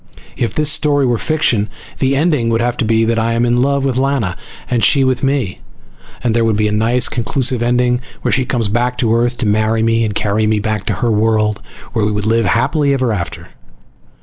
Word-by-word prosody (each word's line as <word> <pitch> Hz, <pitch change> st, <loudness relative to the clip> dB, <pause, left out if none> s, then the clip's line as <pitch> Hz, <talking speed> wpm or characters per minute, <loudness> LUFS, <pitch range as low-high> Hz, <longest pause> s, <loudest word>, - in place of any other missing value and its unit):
If 120 Hz, -, -2 dB
this 150 Hz, -1 st, +3 dB
story 145 Hz, -2 st, +2 dB
were 120 Hz, -3 st, 0 dB
fiction 120 Hz, -9 st, 0 dB, 0.3 s
the 135 Hz, 0 st, +1 dB
ending 145 Hz, -6 st, +1 dB
would 115 Hz, 0 st, +1 dB
have 120 Hz, 0 st, 0 dB
to -, -, 0 dB
be 115 Hz, +1 st, +2 dB
that 115 Hz, 0 st, 0 dB
I 115 Hz, +1 st, 0 dB
am 115 Hz, +1 st, +1 dB
in 120 Hz, 0 st, +2 dB
love 140 Hz, +1 st, +1 dB
with 130 Hz, -2 st, -1 dB
Lana 130 Hz, -9 st, 0 dB, 0.3 s
and 120 Hz, -2 st, 0 dB
she 140 Hz, -2 st, +4 dB
with 130 Hz, -1 st, 0 dB
me, 135 Hz, -9 st, -1 dB, 0.6 s
and 120 Hz, -3 st, +1 dB
there 115 Hz, -, +2 dB
would 110 Hz, -2 st, +1 dB
be 105 Hz, 0 st, +1 dB
a -, -, -1 dB
nice 115 Hz, +3 st, +2 dB
conclusive 125 Hz, +1 st, -1 dB
ending 125 Hz, +1 st, +1 dB, 0.2 s
where -, -, 0 dB
she 130 Hz, -, +2 dB
comes 120 Hz, -3 st, -1 dB
back 120 Hz, +4 st, -1 dB
to 115 Hz, -3 st, +1 dB
Earth 120 Hz, +1 st, 0 dB
to 120 Hz, -, -2 dB
marry 110 Hz, +2 st, +1 dB
me 115 Hz, 0 st, +2 dB
and 105 Hz, -2 st, -2 dB
carry 105 Hz, +1 st, 0 dB
me 110 Hz, 0 st, +1 dB
back 105 Hz, -1 st, -3 dB
to -, -, +1 dB
her 115 Hz, -, +2 dB
world, 110 Hz, -1 st, +1 dB, 0.3 s
where 110 Hz, -, 0 dB
we 105 Hz, -, +1 dB
would 105 Hz, 0 st, -2 dB
live 115 Hz, +1 st, +2 dB
happily 140 Hz, -, +1 dB
ever 130 Hz, -4 st, 0 dB
after. 85 Hz, -5 st, -5 dB
115 Hz, 225 wpm, -16 LUFS, 110-130 Hz, 0.6 s, she